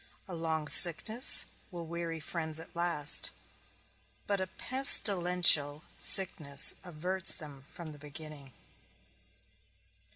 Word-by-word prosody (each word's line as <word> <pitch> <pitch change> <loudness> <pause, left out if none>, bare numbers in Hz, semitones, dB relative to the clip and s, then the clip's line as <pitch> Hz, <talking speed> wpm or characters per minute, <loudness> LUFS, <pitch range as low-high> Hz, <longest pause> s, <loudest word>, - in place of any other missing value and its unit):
A 185 - -7
long 160 -2 -3
sickness 215 - +4 0.2
will 175 -3 -8
weary 165 0 -5
friends 160 0 -5
at 165 - -10
last, 170 -4 +1 1.0
but 200 -2 -1
a 190 - -2
pestilential 180 - +3 0.2
sickness 160 -6 +2
averts 180 +2 -2
them 145 -4 -10
from 170 -3 -10
the 145 - -11
beginning. 150 -2 -11
165 Hz, 100 wpm, -31 LUFS, 150-180 Hz, 1.0 s, sickness